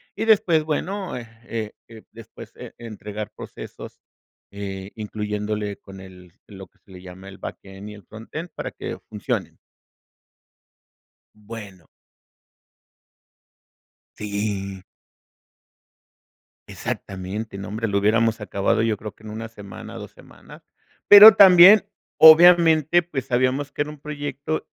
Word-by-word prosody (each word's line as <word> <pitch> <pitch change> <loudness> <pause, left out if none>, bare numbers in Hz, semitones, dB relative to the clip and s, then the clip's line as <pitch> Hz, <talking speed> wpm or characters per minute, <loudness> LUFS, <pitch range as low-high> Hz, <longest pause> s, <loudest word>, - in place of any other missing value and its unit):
y - - -3
después 185 -8 +3
bueno, 185 +5 -4
eh 120 -2 -8 0.2
eh 110 -2 -5 0.2
eh, 110 -1 -14
después, 115 0 -13
eh, - - -11
entregar 105 -2 -8
procesos, - - -11 0.5
eh, 100 -1 -8
incluyéndole 105 -1 -5
con 95 -1 -14
el 90 -2 -15
lo 95 -2 -12
que - - -38
se 100 - -23
le 90 -1 -12
llama 95 +1 -12
el 95 - -13
backend 95 +1 -10
y - - -10
el 105 -1 -15
frontend, 115 - -9
para - - -6
que - - -7
funcionen. - - -5 1.8
Bueno. 105 -5 -12 2.3
Sí. 100 -2 -4 1.8
Exactamente, 100 +3 -6
nombre, 105 +3 -5
lo 100 0 0
hubiéramos 115 +2 +1
acabado 105 +1 -1
yo 115 -2 0
creo 105 0 -8
que - - -24
en 110 - -10
1 110 +1 -7
semana, 100 -4 -11
2 - - -9
semana, - - -17 0.4
pero 205 +1 +10
también, 190 +2 +8 0.3
obviamente, 165 0 +6
pues 150 -7 -6
sabíamos 130 +3 -1
que - - -2
era 150 - -7
un 150 - -12
proyecto 145 +1 -5
110 Hz, 125 wpm, -22 LUFS, 100-145 Hz, 2.3 s, pero